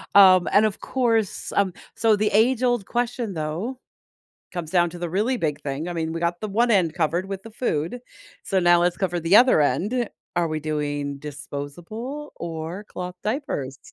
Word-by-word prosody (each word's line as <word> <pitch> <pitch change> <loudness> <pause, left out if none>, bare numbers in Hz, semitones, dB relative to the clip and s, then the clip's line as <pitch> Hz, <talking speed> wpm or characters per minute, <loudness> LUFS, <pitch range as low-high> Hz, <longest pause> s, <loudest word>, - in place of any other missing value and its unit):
Um, 185 -3 +8
and, 205 +2 +5
of 210 -2 -1
course, 225 -5 0
um, 195 -3 +2 0.2
so 225 -1 +4
the 210 +1 +1
age-old 240 0 +2
question, 240 -3 -2
though, 170 +11 -3 0.7
comes 175 -3 -5
down 175 -1 +3
to 175 - -9
the 175 -1 -4
really 215 +8 +1
big 150 -8 -2
thing. 145 +4 -3
I 175 - -3
mean, 160 -1 -2
we 165 - -4
got 170 0 -1
the 215 - -3
one 235 +4 +2
end 175 -7 +3
covered 170 +2 0
with 195 -1 -5
the 225 - -9
food, 215 -2 -2 0.4
so 195 -4 +1
now 175 -1 +5
let's 175 0 +2
cover 175 -3 -1
the 165 +5 +5
other 250 -8 +6
end. 205 - +1 0.3
Are 170 -2 +2
we 155 - -2
doing 145 -2 -2
disposable 170 - -7
or 170 +4 -5
cloth 180 -2 -7
diapers? 210 - -3
180 Hz, 180 wpm, -24 LUFS, 160-220 Hz, 0.7 s, Um